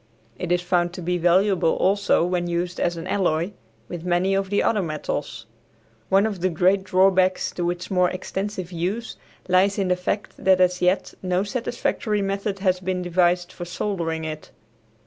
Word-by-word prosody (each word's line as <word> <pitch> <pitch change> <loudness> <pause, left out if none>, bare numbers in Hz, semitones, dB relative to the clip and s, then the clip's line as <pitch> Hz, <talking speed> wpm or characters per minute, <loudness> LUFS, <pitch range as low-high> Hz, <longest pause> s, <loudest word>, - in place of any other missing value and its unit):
It 180 - -3
is 175 0 +2
found 175 -1 +1
to 180 - -7
be 180 +1 0
valuable 180 0 +3
also 200 -2 +2
when 175 -1 -1
used 175 +1 -2
as 175 -1 0
an 165 - -6
alloy 180 -2 0 0.4
with 175 -2 -7
many 180 +2 +1
of 195 0 0
the 205 - +1
other 215 -3 +2
metals. 155 -5 -4 0.6
One 195 +2 +4
of 205 -5 -3
the 185 - +2
great 185 +3 +2
drawbacks 185 0 +3
to 175 -1 -2
its 175 +1 -5
more 180 -1 +3
extensive 185 0 -4
use 190 +8 -3 0.3
lies 190 +2 +3
in 195 -2 0
the 180 - +3
fact 180 +3 -4
that 190 -1 +5
as 180 0 +2
yet 180 +2 +1
no 185 0 0
satisfactory 215 -2 -2
method 195 +1 -2
has 185 -2 +1
been 185 0 -2
devised 175 0 +1
for 180 - -8
soldering 170 -3 -3
it. 155 -1 -6
180 Hz, 175 wpm, -23 LUFS, 175-195 Hz, 0.6 s, that